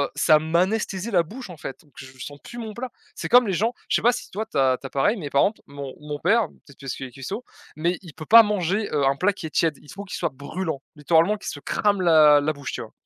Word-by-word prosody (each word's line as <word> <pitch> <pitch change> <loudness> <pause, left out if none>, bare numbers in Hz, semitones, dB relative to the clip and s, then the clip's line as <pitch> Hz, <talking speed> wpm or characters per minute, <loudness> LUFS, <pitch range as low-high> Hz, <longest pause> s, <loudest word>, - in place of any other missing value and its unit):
ça, 155 - +5
heu, - - -1
m'anesthésie 185 +6 0
la 175 -4 +4
bouche, 230 +7 -9
en 175 - -10
fait, 135 -2 -8
donc 150 - -27
je 130 0 -11
sens 145 +3 -8
plus 240 - -10
mon 225 -2 -6
plat. 250 +4 -5 0.3
C'est - - -4
comme 245 -1 +6
les 195 - 0
gens 225 +7 +1 0.2
je - - +2
sais - - -3
pas 240 - +5
si - - -6
toi 215 +3 -3
tu 220 - -6
as 130 -2 +3
tu - - -13
as - - -13
pareil, 175 - +1
mais 155 -7 -5
par 140 - +3
exemple, 215 - -1
mon 140 -1 -7
mon 150 0 -6
père, 220 +7 +3
peut-être 140 - -20
parce 135 -2 -5
qu'il 135 - -6
est - - -15
cuistot 135 - -6 0.3
mais 170 +3 0
il 175 -5 -12
peut 155 +1 -9
pas 230 +5 +9
manger, 205 0 -1
heu, 145 -2 +2
un 135 0 +3
plat 195 +7 +2
qui 185 - -8
est - - -4
tiède, 160 -1 +1
il 150 - -14
faut 200 - -7
qu'il 190 - -6
soit 170 - -1
brûlant, 145 +2 -4
littéralement 165 +6 +3
qu'il - - -6
se 145 - -8
crame 200 +6 0
la 155 -4 +6
la 155 +2 0
bouche, 140 -2 -6
tu - - -4
vois? 110 - -10
165 Hz, 290 wpm, -24 LUFS, 145-205 Hz, 0.3 s, pas